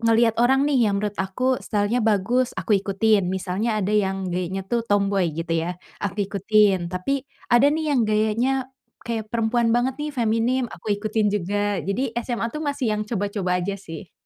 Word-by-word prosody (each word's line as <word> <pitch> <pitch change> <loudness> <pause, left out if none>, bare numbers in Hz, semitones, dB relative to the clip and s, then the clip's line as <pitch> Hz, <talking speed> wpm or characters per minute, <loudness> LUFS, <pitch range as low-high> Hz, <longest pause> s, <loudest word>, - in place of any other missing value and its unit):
ngeliat 230 0 +3
orang 265 +3 +4
nih 265 -6 +3
yang 205 - +1
menurut 205 0 -3
aku 250 +7 0
style-nya 210 +3 0
bagus, 225 +4 +1
aku - - -1
ikutin. 200 0 +2
Misalnya 190 +4 -1
ada 195 - -1
yang 195 -3 0
gayanya 185 +2 -2
tuh 235 - +2
tomboy 200 -5 +1
gitu 165 +1 -5 0.2
ya, 180 - -3 0.3
aku 200 -1 -3
ikutin, 200 -2 +3
tapi 260 +10 -2 0.3
ada 240 +3 +6
nih 315 0 -2
yang 270 - +3
gayanya 215 +4 +1 0.5
kayak 225 -2 -3
perempuan 230 +1 +1
banget 245 +2 +1
nih 300 0 -3
feminim, 235 +2 +1
aku - - -12
ikutin 215 +1 0
juga, 205 +1 -1
jadi 230 +5 -2
SMA 235 -1 -2
tuh 305 - -3
masih 285 -3 -1
yang 210 - -2
coba-coba 200 -4 -1
aja 190 +3 -2
sih. 180 -2 -9
215 Hz, 175 wpm, -23 LUFS, 195-240 Hz, 0.5 s, ada